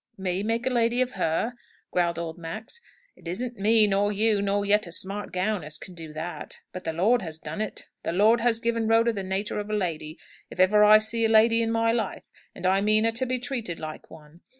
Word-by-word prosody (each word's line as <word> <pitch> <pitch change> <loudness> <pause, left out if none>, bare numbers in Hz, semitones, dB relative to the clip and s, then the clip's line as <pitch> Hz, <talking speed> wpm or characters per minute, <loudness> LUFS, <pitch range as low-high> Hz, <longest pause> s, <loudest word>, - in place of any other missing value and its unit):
"Me 190 -1 -2
make 230 +3 -1
a 260 - +1
lady 240 0 +1
of 255 0 +1
her?" 165 +9 -1 0.4
growled 170 -2 0
old 165 -1 -4
Max. 215 - -7 0.3
"It - - -14
isn't 235 +7 -4
me, 215 +2 +5
nor 205 0 +1
you, 210 0 +2
nor 200 0 0
yet 205 -1 +3
a - - -9
smart 195 +3 -1
gown, 185 +1 -1
as 155 +1 -5
can 185 - -9
do 165 -3 -9
that. 160 +3 -7
But 185 - -8
the 160 - -2
Lord 215 +9 +2
has 160 -4 -7
done 210 - -6
it. 215 - -5
The - - -3
Lord 215 +6 +4
has 230 -1 +2
given 230 -1 -1
Rhoda 230 +1 +3
the 200 - -4
natur' 190 +3 -2
of 205 0 -6
a - - -3
lady, 160 -5 -3 0.3
if - - -11
ever 210 +3 +5
I 210 +1 +8
see 225 +2 -1
a - - +2
lady 225 +1 +5
in 225 - 0
my 225 0 +2
life; 225 -4 -3 0.2
and 185 - -7
I 190 +1 +3
mean 215 +1 +3
her 230 - +2
to 230 +3 -2
be 255 +1 -1
treated 240 - -4
like 155 0 -8
one. 155 +2 -15
210 Hz, 235 wpm, -26 LUFS, 180-230 Hz, 0.4 s, I